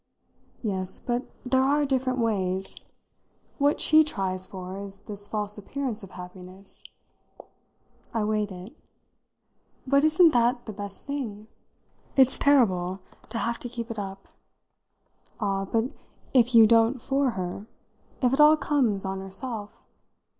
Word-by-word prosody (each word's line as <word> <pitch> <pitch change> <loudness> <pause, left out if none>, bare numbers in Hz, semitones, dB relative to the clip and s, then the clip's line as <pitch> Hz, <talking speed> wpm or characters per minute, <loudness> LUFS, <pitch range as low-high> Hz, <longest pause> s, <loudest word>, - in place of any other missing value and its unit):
"Yes, 190 -3 -2
but 245 +1 -3 0.2
there 260 +1 +3
are 285 +2 +2
different 260 -1 0
ways. 195 -5 -1 0.8
What 285 +2 +2
she 315 0 +6
tries 190 -9 -3
for 185 -1 -7
is 200 0 -8
this 205 -1 -7
false 210 -1 -2
appearance 245 +1 -4
of 195 - -10
happiness." 185 +1 -11 1.3
I 225 -2 -1
weighed 210 -1 0
it. 185 +8 -10 1.1
"But 280 +2 +3
isn't 320 +2 +6
that 240 +1 +2
the 215 - -6
best 200 -1 -7
thing?" 235 -8 -5 0.7
"It's 265 -1 +5
terrible 190 -10 +3 0.3
to 230 - -4
have 235 0 -1
to 245 - -5
keep 235 -1 -5
it 220 - -5
up." 195 -1 -7 1.1
"Ah, 195 -2 -1
but 225 +6 0 0.4
if 245 -1 +4
you 225 -1 +9
don't 230 +3 +4
for 270 +2 +1
her? 185 +3 -4 0.6
If 250 0 +3
it 270 - 0
all 300 +1 +8
comes 240 -11 +1
on 190 0 -3
herself?" 205 +3 -5
220 Hz, 135 wpm, -26 LUFS, 195-260 Hz, 1.3 s, you